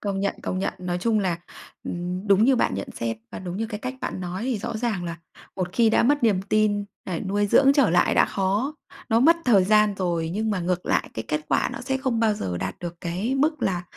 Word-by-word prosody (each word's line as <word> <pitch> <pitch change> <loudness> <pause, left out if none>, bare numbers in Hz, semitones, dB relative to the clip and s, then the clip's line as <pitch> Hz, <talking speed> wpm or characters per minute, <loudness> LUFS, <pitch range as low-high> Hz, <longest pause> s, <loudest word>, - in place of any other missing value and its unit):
Công 200 -2 -2
nhận, 200 0 0
công 185 - -2
nhận, 190 - -1
nói 180 -1 -3
chung 225 +2 +2
là, 180 -4 -1 0.5
ừm, 180 +3 -4
đúng 200 +1 +5
như 260 +1 +4
bạn - - +1
nhận - - -4
xét 115 -1 -1 0.2
và - - -5
đúng 180 0 -6
như 225 - -2
cái 210 -2 -6
cách 255 +2 -4
bạn - - -4
nói 180 +3 -4
thì 250 -4 -1
rõ 230 +2 -4
ràng 215 -6 -2
là 170 -1 -4 0.4
một 180 -1 -3
khi 230 +1 +4
đã - - +3
mất 290 +3 +2
niềm 200 -5 +3
tin, 205 0 +1 0.2
lại 180 -3 -3
nuôi 205 +2 0
dưỡng 275 +6 +5
trở 280 - +3
lại 175 +1 +3
đã - - +5
khó, 205 +9 -1 0.3
nó 225 -1 +3
mất 330 +6 +6
thời 205 -7 +5
gian 210 +1 +4
rồi, 170 -3 -1
nhưng 215 +3 -1
mà 200 -3 -1
ngược 180 +1 -2
lại - - 0
cái 110 - -3
kết 150 - 0
quả - - +2
nó - - -6
sẽ 265 +1 -1
không 260 -4 -1
bao 220 -2 +3
giờ 90 - -3
đạt 95 +1 -4
được 175 -1 -6
cái 185 +9 -2
mức 305 +3 +1
là 180 -2 0
200 Hz, 255 wpm, -24 LUFS, 180-230 Hz, 0.5 s, mất